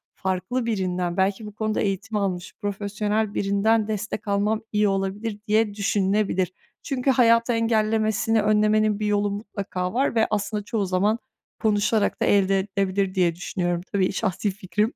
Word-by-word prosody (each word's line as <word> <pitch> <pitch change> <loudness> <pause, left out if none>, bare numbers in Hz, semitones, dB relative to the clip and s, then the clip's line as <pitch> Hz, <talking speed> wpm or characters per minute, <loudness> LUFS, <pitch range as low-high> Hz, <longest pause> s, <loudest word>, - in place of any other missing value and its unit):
farklı 190 +6 -2
birinden, 180 -5 -1
belki 195 +3 +1
bu 210 -1 -9
konuda 215 0 -1
eğitim 205 +2 -2
almış 185 -3 -2
profesyonel 205 +1 -1
birinden 210 +2 +2
destek 210 0 -4
almam 205 +2 +1
iyi 210 0 +2
olabilir 200 +2 -2
diye 215 -1 +2
düşünülebilir. 195 -2 0 0.3
Çünkü 265 0 0
hayatı 230 -1 +4
engellemesini 220 -1 +1
önlemenin 215 0 +2
bir 215 - -1
yolu 205 -1 +1
mutlaka 200 -3 -4
var 260 +1 +1
ve 220 -1 +3
aslında 210 0 -2
çoğu 210 -1 -1
zaman 200 +5 +1 0.4
konuşarak 210 0 +1
da - - +3
elde 195 -1 +3
edilebilir 195 -1 -1
diye 175 -3 +2
düşünüyorum. 175 -1 -2
Tabii 195 -1 +1
şahsi 195 +2 -1
fikrim. 205 +3 -1
205 Hz, 145 wpm, -24 LUFS, 195-215 Hz, 0.4 s, hayatı